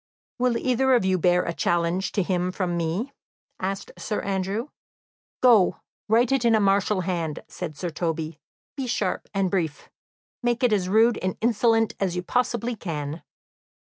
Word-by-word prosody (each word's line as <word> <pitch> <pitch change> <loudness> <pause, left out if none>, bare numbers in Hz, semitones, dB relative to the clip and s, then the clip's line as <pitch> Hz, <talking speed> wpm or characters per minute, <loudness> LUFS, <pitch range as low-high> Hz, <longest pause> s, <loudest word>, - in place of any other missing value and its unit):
"Will 245 -1 +2
either 260 +1 +2
of 235 - +2
you 185 -1 +2
bear 180 +1 +3
a 170 - -3
challenge 175 +3 0
to 195 - +1
him 180 0 0
from 180 -2 -2
me?" 170 +11 -2 0.5
asked 195 +1 -3
Sir 215 - -2
Andrew. 195 +6 -2 0.7
"Go, 230 -7 +5 0.3
write 230 +3 +3
it 270 -3 +2
in 230 -1 +4
a - - +4
martial 200 0 +2
hand," 170 -4 -3
said 155 -5 -6
Sir 175 -2 -3
Toby. 160 -1 -3 0.4
"Be 270 -3 -3
sharp 195 -5 -1
and 195 -2 0
brief. 165 -6 -2 0.5
Make 240 0 0
it 245 -3 +4
as 185 -3 0
rude 225 +3 +4
and 185 0 -2
insolent 225 -1 +2
as 185 -3 0
you 180 - -2
possibly 240 +2 0
can." 155 -5 -5
195 Hz, 165 wpm, -25 LUFS, 175-230 Hz, 0.7 s, Go